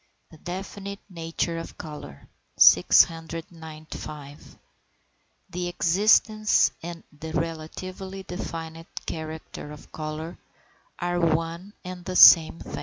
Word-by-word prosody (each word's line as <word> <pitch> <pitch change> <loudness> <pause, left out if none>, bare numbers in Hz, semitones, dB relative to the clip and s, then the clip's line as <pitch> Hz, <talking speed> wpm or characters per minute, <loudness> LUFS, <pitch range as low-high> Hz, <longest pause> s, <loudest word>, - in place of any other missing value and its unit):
THE 160 - -14
DEFINITE 195 +3 -6
NATURE 165 0 -3
OF 165 - -9
COLOUR. 110 - -9 0.3
695. 160 -3 +2 0.9
The 180 0 -3
existence 210 +5 +3
and 170 0 -7
the 160 +2 -8
relatively 185 +4 -5
definite 165 -2 -7 0.2
character 160 -2 -7
of 150 - -13
colour 155 +2 -6 0.6
are 175 0 -1
one 165 +3 -1
and 180 -1 -7
the 185 +1 -5
same 165 -2 +9
thing. - - -7
165 Hz, 100 wpm, -25 LUFS, 160-180 Hz, 0.9 s, same